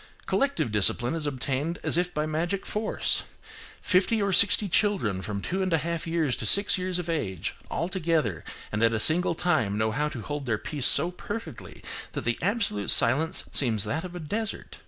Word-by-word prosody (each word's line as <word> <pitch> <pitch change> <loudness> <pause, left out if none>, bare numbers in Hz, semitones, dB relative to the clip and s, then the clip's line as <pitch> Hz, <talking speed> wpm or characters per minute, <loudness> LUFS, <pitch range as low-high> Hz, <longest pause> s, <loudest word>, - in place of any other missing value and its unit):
Collective 275 - 0
discipline 110 +5 +3
is 160 -2 -3
obtained 140 +4 -2
as - - +4
if 180 +1 0
by 150 -2 -2
magic 170 +5 -2
force. 215 +1 -1 0.6
Fifty 190 +5 +2
or 200 -1 0
sixty 205 +2 +4
children 175 - +1
from 100 0 -5
two 190 +2 -2
and 185 -1 -1
a - - +4
half 165 +2 -4
years 160 -6 0
to - - -1
six 200 +1 +6
years 185 -1 -2
of 175 -2 -4
age, 100 - -3 0.2
all 165 - -2
together, 160 - -1 0.3
and 105 - -2
at 115 0 +3
a - - -1
single 170 +7 +5
time 120 - 0
know 110 +1 0
how 150 +6 -1
to 120 -7 -7
hold 145 -2 -5
their 115 -2 0
peace 145 +3 -1
so 175 - +6
perfectly 205 - -8 0.3
that - - -3
the 120 0 -2
absolute 200 - -1
silence 155 +9 +2
seems 115 -7 +2
that 160 +4 -3
of 180 -1 -8
a - - -5
desert. 210 +8 -4
160 Hz, 195 wpm, -26 LUFS, 120-185 Hz, 0.6 s, six